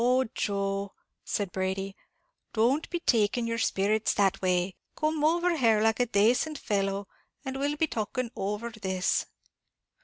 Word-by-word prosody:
"Oh, 255 +2 +4
Joe," 200 -1 -1 0.3
said 200 -3 -2
Brady, 195 +1 -2 0.6
"don't 250 +8 +2
be 345 - -2
taking 230 -1 +2
your 230 0 -1
sperrits 215 +1 +1
that 195 -2 +2
way; 180 0 +1 0.2
come 310 -1 0
over 340 +2 +3
here, 230 -7 +4
like 225 +1 +2
a 245 - +2
dacent 245 +9 +2
fellow, 195 -3 -1 0.4
and 265 0 -3
we'll 290 +1 0
be 320 - +3
talking 235 -1 -3
over 210 +4 -3
this." 190 -4 -1
220 Hz, 145 wpm, -28 LUFS, 195-255 Hz, 0.6 s, Oh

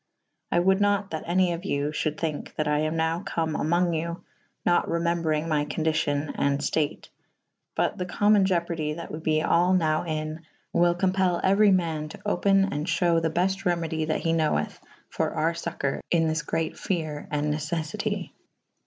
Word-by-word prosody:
I - - +2
wolde 190 +2 +3
nat 205 -1 +1
that 160 - -4
any 180 0 +2
of 170 +2 -6
you 145 -6 -1
fhulde 155 0 -2
thynke 155 -3 -4
that 155 - -1
I 150 0 +2
am 155 +1 0
nowe 160 +1 0
come 160 -4 -2
amonge 170 +1 +1
you 170 +2 -4 0.4
nat 175 - +3
remembrynge 165 -2 0
my 150 -2 +1
co«dicyon 155 -1 0
and 140 0 +2
ftate 150 +1 -2 0.3
/ - - -55
but - - 0
the 180 - -2
comon 205 +1 +4
ieopardy 170 -4 -1
that 170 - -7
we 155 - -5
be 155 -1 +1
all 175 +2 +3
nowe 155 -3 +2
in 155 -1 -4 0.2
/ - - -42
wyll 175 0 +3
compell 185 -1 +1
euerv 200 +1 +5
man 160 -4 -2
to - - -11
open 195 0 +2
and 150 +3 -3
fhewe 170 -1 +2
the 165 - +1
belte 190 +4 0
remedy 165 -3 0
that 155 - -1
he 165 - +1
knowethe 155 - 0 0.3
for - - -2
our 160 +2 +1
focoure 170 -5 -3
in 165 -2 +3
this 160 0 0
great 160 +1 -3
fere 155 -5 -3
and 150 0 0
neceffyty. 155 +1 -3
165 Hz, 180 wpm, -26 LUFS, 155-175 Hz, 0.4 s, euerv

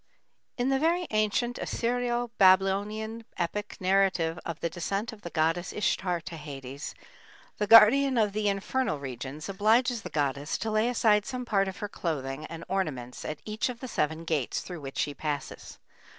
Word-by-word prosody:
C. 245 - 0
In 260 - +1
the 270 0 +2
very 340 +4 +2
ancient 215 +3 +1
Assyrio 240 0 -1
Babylonian 200 +4 +3
epic 200 +4 -3
narrative 185 -3 +2
of 170 -2 -5
the - - -1
descent 195 +7 -3
of 215 - -13
the 170 - -6
goddess 165 +2 0
Ishtar 185 -3 0
to 170 -1 -8
Hades, 140 -1 -7 0.6
the 210 - 0
guardian 245 +5 +7
of 210 -3 +2
the 210 0 +1
infernal 200 - -1
regions 135 +2 -6
obliges 225 +5 +2
the - - -7
goddess 145 0 -1
to 225 - -3
lay 215 +2 +2
aside 215 -3 +3
some 255 -2 -4
part 195 -4 +2
of 190 - -5
her 205 - -4
clothing 150 -6 -4
and 165 0 -8
ornaments 145 -11 -3
at 155 - -5
each 215 +3 -1
of 245 -2 -6
the 255 - -6
seven 160 -7 -1
gates 155 -6 -1
through 175 -4 -8
which 135 -1 -7
she 145 - 0
passes. 145 0 -5
195 Hz, 175 wpm, -28 LUFS, 160-225 Hz, 0.6 s, guardian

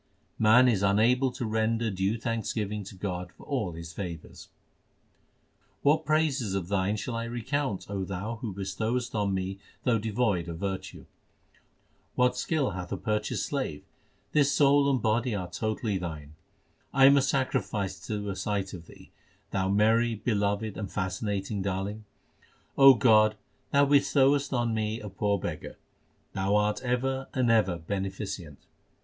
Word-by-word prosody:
Man 115 +4 +6
is 110 -6 +2
unable 115 +7 +3
to 120 - -4
render 110 +1 0
due 95 +4 0
thanksgiving 110 -3 -2
to 95 - -10
God 90 -2 -4
for - - -14
all 115 - -2
His 85 0 -8
favours: 85 -4 -7 1.3
What 155 +2 +3
praises 145 -9 +1
of 95 -2 -3
Thine 100 +1 +1
shall 115 +3 -4
I 115 0 -2
recount, 120 -1 -2
O 100 -1 -3
Thou 100 +5 -4
who 110 -1 -5
bestowest 110 +6 -2
on 105 -2 0
me 95 +1 -3 0.2
though 115 -3 +2
devoid 105 -5 0
of 80 - -5
virtue? 95 +1 -5 1.1
What 125 0 +3
skill 140 +2 0
hath 90 0 -6
a - - -2
purchased 105 0 -1
slave? 130 - -3 0.5
this 145 -2 +3
soul 140 +1 +4
and 135 -2 +2
body 115 +1 +1
are 95 -3 -3
totally 110 -1 -2
Thine. 75 -4 -6 0.6
I 135 -1 +5
am 140 +1 +8
a 140 - +5
sacrifice 130 -7 -1
to 105 -2 -3
a - - -5
sight 95 0 -2
of 85 -3 -9
Thee, - - -16 0.4
Thou 95 -1 0
merry, 110 +3 +3
beloved, 105 -1 -1
and 100 -3 -5
fascinating 95 +2 -2
Darling. 100 +3 -3 0.7
O 135 -1 +9
God, 110 -2 +5 0.3
Thou 140 0 +4
bestowest 140 0 +3
on 120 -3 0
me 110 0 -1
a 105 - -7
poor 100 +1 0
beggar; - - -6 0.6
Thou 95 +1 0
art 105 +1 +1
ever 130 +2 -1
and 125 -3 +3
ever 95 -6 +3
beneficent. 95 -3 -5
105 Hz, 150 wpm, -28 LUFS, 95-125 Hz, 1.3 s, O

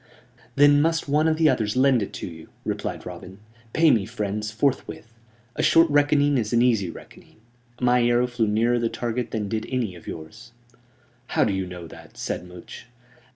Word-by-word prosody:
"Then 145 0 +6
must 165 0 0
one 150 +3 +2
of 160 -1 +1
the 160 -1 +4
others 115 -6 +1
lend 130 -2 +4
it 100 - -4
to - - -6
you," 80 -2 -11 0.2
replied - - -4
Robin. 95 +1 -9 0.3
"Pay 160 +2 +4
me, 105 -4 +1
friends, 105 -2 -3
forthwith. 115 -1 -2 0.4
A - - -1
short 165 +1 +5
reckoning 145 -1 +3
is 110 -2 -3
an 120 0 +4
easy 110 -7 +2
reckoning. - - -14 0.4
My 125 0 +3
arrow 120 +1 +3
flew 120 -3 -1
nearer 115 +3 +2
the 115 -1 0
target 120 0 -3
than 110 -2 -3
did 110 +1 -3
any 125 -7 -2
of 85 - -14
yours." 80 +9 -9 0.7
"How - - +1
do 105 - 0
you 95 -1 -2
know 90 -1 -8
that?" 80 - -14
said 90 - -4
Much. 90 +7 -12
120 Hz, 185 wpm, -24 LUFS, 105-140 Hz, 0.7 s, Then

